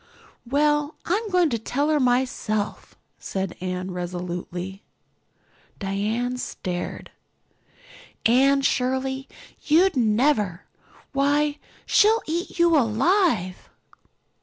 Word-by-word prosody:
"Well, 295 +3 +1
I'm 420 +5 -1
going 365 -2 +3
in 330 - +3
to 230 - -1
tell 280 +7 -1
her 305 -1 +3
myself," 245 -5 -1 0.2
said 190 -2 -4
Anne 185 0 -3
resolutely. 180 +1 -5 1.0
Diana 220 +6 -2
stared. 180 -6 -5 1.1
"Anne 275 +4 +4
Shirley, 265 +1 0 0.4
you'd 340 +4 +4
never! 215 - +1 0.5
why 290 +2 +1 0.3
she'll 445 +2 +4
eat 340 +3 -3
you 340 -1 +4
alive!" 240 - +1
255 Hz, 90 wpm, -24 LUFS, 195-295 Hz, 1.1 s, Anne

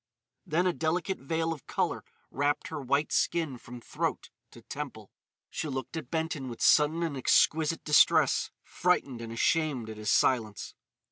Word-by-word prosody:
Then 170 +4 +1
a 180 - +2
delicate 175 +4 -1
veil 160 +4 -1
of 150 - -13
colour - - -1 0.3
wrapped 145 +1 -1
her 155 -2 -5
white 140 +3 0
skin 160 -7 0
from 120 +1 -10
throat - - -4 0.2
to - - -15
temple; - - -7 0.4
she 160 - -3
looked 130 +1 -5
at 155 -6 -6
Benton 160 -5 -3
with 120 - -8
sudden 155 +3 +4
and 160 -4 -2
exquisite 155 +4 +2
distress, 150 -1 +4
frightened 140 -9 0
and 115 -1 -7
ashamed 130 -2 0
at 110 - -9
his 105 -1 -3
silence. 110 -5 +1
150 Hz, 155 wpm, -29 LUFS, 130-165 Hz, 0.4 s, sudden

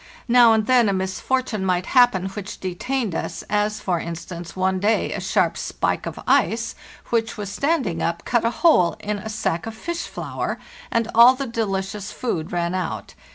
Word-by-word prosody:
Now 240 -1 +7
and 220 -1 +2
then 245 -3 +4
a - - +1
misfortune 200 +4 -1
might 180 -1 +1
happen 245 -8 +4
which 195 0 -7
detained 210 +4 -2
us, - - -4
as, 210 +1 +1
for 180 -3 -1
instance, 170 +1 -7
one 185 0 +1
day 210 +3 +1
a - - -4
sharp - - +1
spike - - -2
of - - -6
ice 230 0 +2 0.4
which 225 -1 0
was 205 -2 -5
standing 280 - 0
up 170 0 -2
cut 240 -2 +1
a 230 - +3 0.2
hole 180 - +5
in 210 -1 -3
a 220 - -7
sack 210 -4 -2
of 225 - -6
fish 340 +9 -4
flour, - - -4 0.3
and 230 -1 0
all 240 +3 +8
the 275 +1 -3
delicious 210 -3 -3
food 175 -11 -3
ran 175 0 -1
out. 185 0 -4
210 Hz, 180 wpm, -22 LUFS, 185-235 Hz, 0.4 s, all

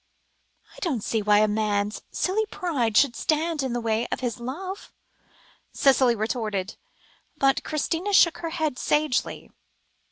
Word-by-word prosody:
"I - - -13
don't 275 - -2
see 225 - -1
why 210 0 +4
a 215 - +4
man's 210 -1 -1
silly 425 +4 -1
pride 275 - -1
should 265 -3 +4
stand 315 +2 0
in 260 -3 -2
the 240 - -1
way 225 0 -1
of - - -4
his 245 -2 -3
love," 370 +11 -6 0.8
Cicely 260 -3 +4
retorted; 215 -3 -3 0.6
but 270 0 +2
Christina 325 +5 -2
shook 345 -4 +5
her 335 - -4
head 315 -6 -2
sagely. 295 -4 -1
260 Hz, 140 wpm, -25 LUFS, 220-325 Hz, 0.8 s, shook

